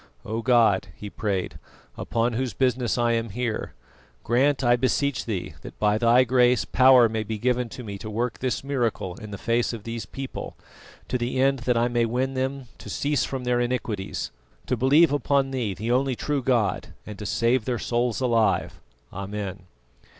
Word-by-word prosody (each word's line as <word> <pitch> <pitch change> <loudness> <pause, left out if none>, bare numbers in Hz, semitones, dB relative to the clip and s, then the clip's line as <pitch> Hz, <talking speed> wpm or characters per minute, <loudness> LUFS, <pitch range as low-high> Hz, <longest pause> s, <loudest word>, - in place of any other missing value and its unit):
"O 110 +2 -3
God," 115 -7 +3
he 105 -1 -8
prayed, 100 -3 -3 0.4
"upon 120 +1 -1
whose 120 -2 -2
business 125 -2 +1
I 120 -1 +2
am 115 0 0
here, 115 +1 -3 0.5
grant, 135 +4 +2
I 120 0 +5
beseech 130 +2 0
Thee, 105 -6 -4
that - - -10
by 105 0 +2
Thy 120 +2 +5
Grace 125 -1 +3
power 130 -2 +6
may 110 0 -2
be 110 0 -4
given 125 +1 0
to 125 - -8
me 100 -3 -7
to 110 - -7
work 115 +3 -2
this 130 0 -2
miracle 120 -9 -1
in 105 - -9
the 100 - -6
face 115 +2 0
of 110 -3 -7
these 115 -3 -5
people, 135 +4 -7 0.5
to 125 - -1
the 120 +2 -2
end 135 0 +3
that 120 - +3
I 120 +1 +3
may 120 -1 +1
win 130 +3 -1
them 135 +1 -2
to - - -10
cease 140 -3 0
from 130 -2 -4
their 125 0 +1
iniquities, 120 -5 -2 0.3
to 125 - 0
believe 140 +6 +4
upon 140 -1 +1
Thee, 120 -7 -2
the 110 +6 -3
only 130 +1 +2
true 145 +3 -1
God, 120 -5 0
and 105 -2 -9
to 105 - -5
save 115 0 +1
their 125 -2 -1
souls 120 0 -1
alive. 115 -3 +1 0.3
Amen." 100 -1 -5
120 Hz, 185 wpm, -25 LUFS, 110-130 Hz, 0.5 s, power